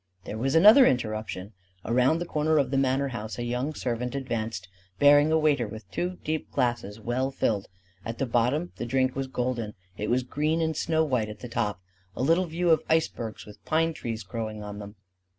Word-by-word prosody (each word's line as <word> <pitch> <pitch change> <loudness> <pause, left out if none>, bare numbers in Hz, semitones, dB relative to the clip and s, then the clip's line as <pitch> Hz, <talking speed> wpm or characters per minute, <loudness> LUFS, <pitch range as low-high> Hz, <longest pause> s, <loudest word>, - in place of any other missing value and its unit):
There 110 - -6
was 135 +4 0
another 215 +10 +8
interruption. 110 -4 -2 0.3
Around 125 +7 +3
the 175 - -3
corner 155 -1 +1
of 135 -3 +1
the 135 - +1
manor 135 +1 +1
house 110 -3 -6
a 120 - -3
young 125 +5 -2
servant 125 +1 -3
advanced, 115 -8 -3 0.3
bearing 145 +5 +6
a 160 - +4
waiter 145 -6 +2
with 110 +1 -10
two 180 +1 -2
deep 155 0 -2
glasses 115 -4 -1
well 120 +4 -1
filled: 105 -6 -1 0.4
at 115 +1 -5
the 135 - 0
bottom 125 +8 +1
the - - -3
drink 130 +1 +1
was 135 0 -2
golden; 125 -4 -2 0.2
it 105 - -3
was 125 +1 +2
green 150 +5 0
and 160 -1 0
snow 160 +1 +1
white 125 -8 0
at 105 - -9
the 125 - -6
top: 105 -5 -2 0.4
a - - -2
little 165 +6 +3
view 170 +1 +1
of 160 - +4
icebergs 120 -9 -1
with 105 0 -14
pine 165 +1 +1
trees 115 -6 -5
growing 110 +2 -5
on 105 0 -7
them. 105 +1 -9
125 Hz, 200 wpm, -27 LUFS, 110-155 Hz, 0.4 s, another